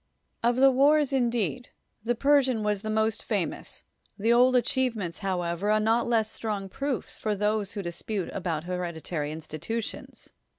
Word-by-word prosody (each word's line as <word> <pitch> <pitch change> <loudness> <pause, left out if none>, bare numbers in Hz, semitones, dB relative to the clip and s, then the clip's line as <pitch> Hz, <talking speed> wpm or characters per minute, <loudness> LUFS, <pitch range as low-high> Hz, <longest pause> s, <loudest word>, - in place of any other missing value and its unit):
Of 235 +1 +2
the 270 +1 +6
wars, 285 +2 +4
indeed, 245 -1 0 0.3
the 240 +2 0
Persian 265 -3 +3
was 210 -2 0
the 215 - -4
most 220 0 +1
famous; - - -3 0.3
the 225 +3 +3
old 250 +2 +5
achievements, 235 -8 0
however, 180 0 -1
are 215 0 +4
not 225 +2 +2
less 225 -2 +1
strong 205 -3 -4
proofs 275 +3 -3
for 215 -1 -2
those 210 0 0
who 200 - -4
dispute 185 +3 -4
about 170 -5 -2
hereditary 170 -4 -3
institutions. 160 +8 -5
215 Hz, 145 wpm, -27 LUFS, 190-240 Hz, 0.3 s, the